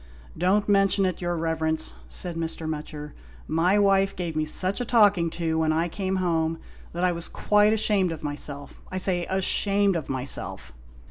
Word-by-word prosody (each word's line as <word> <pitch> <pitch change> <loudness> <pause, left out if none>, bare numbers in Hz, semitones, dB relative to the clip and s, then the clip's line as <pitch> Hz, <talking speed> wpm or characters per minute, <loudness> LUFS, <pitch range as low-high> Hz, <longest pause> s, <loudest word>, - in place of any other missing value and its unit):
"Don't 195 +5 +1
mention 195 -1 +3
it, 185 -2 -2
your 175 -1 -1
Eeverence," 160 -1 0
said 175 -2 -4
Mr. 165 -1 -4
Mutcher, 150 -1 -6 0.2
" - - -22
my 185 +4 +4
wife 195 -1 +3
gave 170 -3 -4
me 155 0 0
such 185 +8 -2
a - - +1
talking 205 -8 +4
to 160 -1 -2
when 160 -1 +2
I 165 +2 +1
came 190 +1 -2
'ome 165 -3 0 0.3
that 175 +1 -3
I 180 - +3
was 170 0 -2
quite 210 0 +3
ashamed 210 -4 +2
of 160 -2 -7
myself 145 -1 -5
— - - -21
^I 185 - -2
say 180 -2 +1
ashamed 195 +1 +2
of 160 -4 -4
myself." 130 0 -4
175 Hz, 185 wpm, -25 LUFS, 160-195 Hz, 0.3 s, my